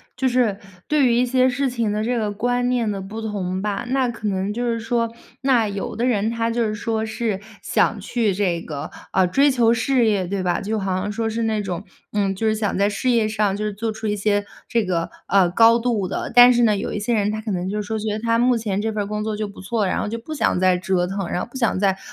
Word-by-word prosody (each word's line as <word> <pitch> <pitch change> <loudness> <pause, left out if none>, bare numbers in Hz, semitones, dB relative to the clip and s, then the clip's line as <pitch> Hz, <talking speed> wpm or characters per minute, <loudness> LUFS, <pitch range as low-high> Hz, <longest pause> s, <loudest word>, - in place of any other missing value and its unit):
就 260 0 0
是 235 -5 +1 0.3
对 295 -4 +3
于 235 - +3
一 250 +1 +3
些 255 +1 +3
事 270 +2 0
情 235 -4 -1
的 210 +1 -1
这 245 +2 0
个 210 -1 -1
观 245 +4 0
念 235 -4 +1
的 195 -1 -4
不 210 +4 -7
同 190 -4 -3
吧， 210 +4 -2
那 260 -1 +2
可 230 -3 -4
能 195 +1 -1
就 240 +2 -3
是 230 -1 0
说， 230 0 -1 0.3
那 250 -5 +3
有 200 -1 -4
的 240 - 0
人 220 -3 +1
他 230 0 -1
就 235 0 0
是 215 - -2
说 220 0 -2
是 220 -2 -2 0.2
想 - - +1
去 225 -4 0
这 180 -4 0
个 145 -4 -6 0.2
啊 190 -1 +3
追 275 +11 +3
求 235 -3 +3
事 240 +1 +2
业， 200 -4 +1
对 195 0 -2
吧， 175 -1 0
就 215 +2 -2
好 190 -2 -1
像 205 +2 -2
说 225 +1 -2
是 225 +1 -2
那 220 -1 0
种， 185 0 -4 0.3
嗯， 195 -2 0
就 225 - -3
是 215 - +3
想 215 -3 -1
在 200 +1 +3
事 210 +5 -1
业 230 -3 +3
上 210 -2 0
就 215 - -2
是 210 - -2
做 220 +2 -2
出 220 +1 -7
一 210 0 0
些 205 0 0 0.2
这 230 -3 +1
个， 170 -2 -1 0.2
呃， 190 -2 +4
高 230 +5 +5
度 225 -6 0
的。 195 - -4
但 245 0 +9
是 240 - +2
呢， 215 -3 +3
有 - - -3
一 210 - -2
些 230 +3 0
人 210 0 +1
他 215 0 -3
可 220 - -6
能 180 -1 -2
就 210 +2 -2
觉 215 0 -3
得 215 - -3
他 230 0 +1
目 245 +1 +3
前 210 -4 -2
这 220 +1 -1
份 210 -1 -2
儿 - - -6
工 210 0 -3
作 215 -1 -2
就 210 0 -3
不 200 - -12
错， 205 0 -1
然 - - 0
后 - - -2
就 230 +2 -4
不 310 +7 -7
想 180 - +1
再 185 -1 +3
折 180 -1 0
腾， 195 -1 -3
然 180 - -1
后 - - -5
不 260 - -7
想 230 -6 +1
再 195 -1 +2
215 Hz, 290 characters per minute, -22 LUFS, 200-235 Hz, 0.3 s, 但